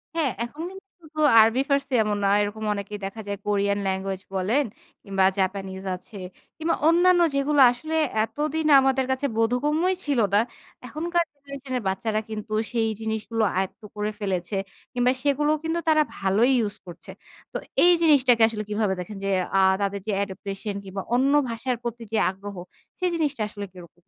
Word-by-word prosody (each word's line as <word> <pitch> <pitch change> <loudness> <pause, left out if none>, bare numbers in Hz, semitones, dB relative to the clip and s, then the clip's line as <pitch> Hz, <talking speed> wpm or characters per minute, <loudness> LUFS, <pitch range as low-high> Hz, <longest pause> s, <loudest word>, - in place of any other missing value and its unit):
হ্যাঁ, 300 -7 +1
এখন 290 +7 -7
কিন্তু 385 +1 -13
শুধু 310 -1 -10 0.2
আরবি, 225 +4 +5
ফার্সি 280 -1 0
এ - - +5
এমন 210 -1 -1
নয়। 200 +1 +4
এরকম 215 +1 -5
অনেকেই 205 +1 -5
দেখা 210 +3 -6
যায়, 200 0 -3
কোরিয়ান 200 0 +1
language 190 0 -3
বলেন 210 +10 +2 0.4
কিংবা, 195 -1 +1
জাপানিজ 190 0 -2
আছে। 195 +3 -15 0.4
কিংবা, 325 +1 0
অন্যান্য 350 +1 +5
যেগুলো 280 +1 +3
আসলে 310 +6 -5 0.3
এতদিন 305 +6 -2
আমাদের 265 0 +2
কাছে 260 +2 -1
বোধগম্যই 295 +11 +1
ছিল 285 -4 +1
না। 205 - +6 0.5
এখনকার 340 +5 0
generation 280 -2 -9
এর 245 - -4
বাচ্চারা 215 +2 -1
কিন্তু 215 0 -6 0.2
সেই 225 -2 +1
জিনিসগুলো 220 0 -2
আয়ত্ত 190 +4 -2
করে 210 0 -2
ফেলেছে। 190 -1 -2 0.4
কিংবা, 245 0 +3
সেগুলোও 295 +2 +2
কিন্তু 325 +1 -1
তারা 310 -1 +5 0.2
ভালোই 200 +6 +2 0.2
use 205 - -7
করছে। 170 0 -11 0.4
তো - - -1 0.3
এই 355 - +7
জিনিসটাকে 265 -7 +5
আসলে 220 -1 -4
কিভাবে 210 -2 0
দেখেন 200 +3 -6
যে, - - 0 0.3
আ - - +5 0.2
তাদের 200 0 -1
যে 215 - 0
adaptation 200 +1 -6
কিংবা, 195 0 -5
অন্য 270 +3 +3 0.2
ভাষার 240 +2 -2
প্রতি 235 0 -5
যে - - +2
আগ্রহ 195 +1 -8 0.4
সেই 365 -1 +1
জিনিসটা 295 -7 -1
আসলে 205 -1 -6
কিরকম? 175 -2 -14
225 Hz, 165 wpm, -25 LUFS, 200-285 Hz, 0.5 s, এই